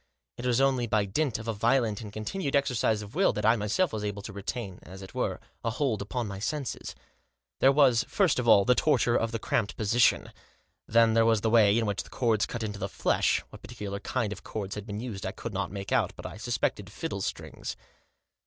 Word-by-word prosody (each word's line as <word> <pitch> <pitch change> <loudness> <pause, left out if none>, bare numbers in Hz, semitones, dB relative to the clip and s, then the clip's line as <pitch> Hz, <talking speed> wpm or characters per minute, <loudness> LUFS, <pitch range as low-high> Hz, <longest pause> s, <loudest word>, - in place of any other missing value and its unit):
It 125 - -4
was 125 0 +2
only 135 -3 +2
by 105 -2 +2
dint 125 +6 0
of 115 +1 -8
a 115 - 0
violent 115 0 +1
and 105 -2 -8
continued 140 - -3
exercise 125 -6 +1
of 105 +2 -11
will 190 +4 +3
that 105 - -2
I 115 - +6
myself 115 - 0
was 110 -1 -3
able 105 -1 -4
to 105 - -7
retain, 100 -1 -5
as 95 +2 -11
it 95 - -11
were, - - -1 0.2
a 115 - 0
hold 125 -2 -1
upon 120 +4 -3
my 100 -1 -6
senses. 135 +4 -4 0.6
There 135 - +6
was, 135 -5 +4
first 190 -10 +2
of 120 - -2
all, 100 -3 +7
the 125 - +5
torture 125 -4 +2
of 115 0 +1
the 115 - -1
cramped 110 -1 -1
position. 115 +3 +2 0.6
Then 115 0 +4
there 115 0 +5
was 115 -2 +3
the 110 - +1
way 110 -2 +5
in 115 - +1
which 100 -1 -1
the - - -13
cords 115 -4 +1
cut 120 -2 -4
into 105 -1 -4
the 95 - -3
flesh - - +1
— - - -38
what - - -12
particular 105 -4 -6
kind 110 -1 -2
of 100 - -11
cords 100 -3 -5
had 105 +1 -7
been 105 -1 -4
used 110 -5 -6
I 95 - -3
could 115 -1 -6
not 95 -1 -2
make 100 +1 -6
out, 110 -7 +2
but - - -10
I 90 +1 -7
suspected 105 -4 -2
fiddle 110 -4 -4
strings. - - -5
110 Hz, 230 wpm, -28 LUFS, 100-125 Hz, 0.6 s, all